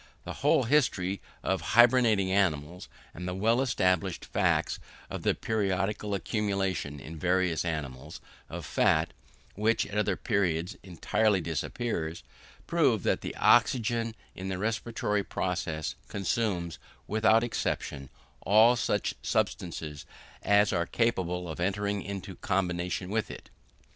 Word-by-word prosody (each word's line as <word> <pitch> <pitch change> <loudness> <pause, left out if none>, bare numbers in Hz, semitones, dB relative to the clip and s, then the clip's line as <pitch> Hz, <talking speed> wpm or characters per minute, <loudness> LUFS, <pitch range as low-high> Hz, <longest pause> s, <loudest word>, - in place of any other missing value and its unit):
The - - -6
whole - - +4
history 105 -9 +1 0.2
of 95 -2 0
hybernating 115 -1 +4
animals, 90 -3 0 0.2
and 90 +2 -6
the 90 - -3
well 115 +6 +2
established 95 -7 +1
facts - - +1 0.3
of - - -4
the - - +2
periodical 105 -1 -1
accumulation, 95 - -2
in 80 +3 -9
various 90 -3 +1
animals, 75 -6 -5 0.3
of - - -6
fat, 80 +1 +2 0.4
which, 110 +3 +1
at 105 +1 -2
other 105 - +1
periods, 90 -3 0
entirely 100 +3 +1
disappears, 85 - -3 0.4
prove - - +2
that - - +1
the - - -5
oxygen, 115 -2 +3 0.2
in 95 +1 -6
the 95 - -2
respiratory 105 0 -1
process, 85 -5 -2
consumes, 95 -4 -1 0.3
without 110 +2 +4
exception, 70 - -3 0.3
all 110 +5 +6
such 120 - 0
substances 80 -4 -2 0.3
as 105 0 +4
are 85 -2 0
capable 90 -7 0
of 80 -1 -6
entering 100 +2 -1
into 100 0 -6
combination 90 -1 -1
with 110 0 -1
it. - - -10
95 Hz, 125 wpm, -29 LUFS, 85-110 Hz, 0.4 s, all